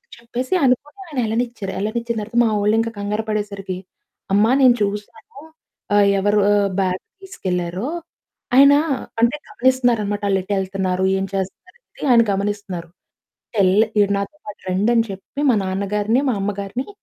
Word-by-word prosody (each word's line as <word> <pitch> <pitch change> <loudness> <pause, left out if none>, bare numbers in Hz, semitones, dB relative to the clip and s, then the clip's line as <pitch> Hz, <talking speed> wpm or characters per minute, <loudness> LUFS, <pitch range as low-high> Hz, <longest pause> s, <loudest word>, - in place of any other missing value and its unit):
చెప్పేసి 235 +5 -4
అనుకోని 280 +8 +1
ఆయన 295 -5 -9
ఏళ్లనిచ్చారు. 225 -3 -2
ఏళ్లనిచ్చిన 235 +4 -2
తర్వాత 225 +3 -5
మా 225 - +2
వొళ్లు 210 +2 +3
ఇంకా 230 0 -1
కంగారు 205 +2 -2
పడేసరికి, 200 -3 -3 0.6
"అమ్మా, 215 +3 +4
నేను 255 -2 +6
చూసాను 210 - -4 0.6
ఆహ్, 205 -1 +5
ఎవరు 205 +2 +2
ఆహ్, 205 -1 +3
బ్యాగ్ 185 -1 -1 0.2
తీసుకెళ్లారో" 180 - -3 0.7
ఆయన 280 +1 +8 0.5
అంటే, 235 +5 +3
గమనిస్తున్నారన్నమాట. 240 -5 +1
ఆళ్లు 195 -1 +2
ఎటు 200 +2 -3
ఏళ్తున్నారు, 190 -1 -1
ఏం - - -1
చేస్తన్నారు 195 - -5 0.2
అని, 295 - -3
ఆయన 235 -1 +7
గమనిస్తున్నారు. 195 -3 -3 0.7
టెల్ 190 -2 +4 0.2
"మీరు 205 -1 +4
నాతో 200 +10 -5
పాటు 210 - -9
రండి" 200 +5 +2
అని 230 -1 +3
చెప్పి 195 +8 -9
మా 225 - +2
నాన్నగారిని, 205 +5 0
మా 245 - +1
అమ్మగారిని 200 +5 -3
210 Hz, 145 wpm, -20 LUFS, 195-235 Hz, 0.7 s, ఆయన